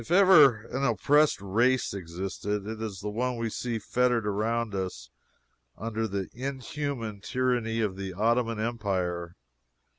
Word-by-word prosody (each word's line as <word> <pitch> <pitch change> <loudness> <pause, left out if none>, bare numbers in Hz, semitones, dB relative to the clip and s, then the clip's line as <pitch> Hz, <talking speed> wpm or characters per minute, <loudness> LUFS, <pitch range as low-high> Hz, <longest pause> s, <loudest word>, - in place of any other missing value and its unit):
If 115 - -13
ever 165 - +7
an 135 - -1
oppressed 140 +5 +3
race 120 +7 +2
existed, 95 +3 -4
it 110 +1 -5
is 105 -4 -5
this - - -15
one 120 +4 -1
we 115 -1 -2
see 120 0 -2
fettered 120 +1 +1
around 110 +2 -1
us 90 -11 -4 0.7
under 110 0 -2
the 100 -2 -3
inhuman 130 -4 -4
tyranny 120 -2 0
of 105 -4 -1
the 95 -1 -5
Ottoman 115 +3 +1
Empire. 95 -7 -2
110 Hz, 140 wpm, -28 LUFS, 100-125 Hz, 0.7 s, ever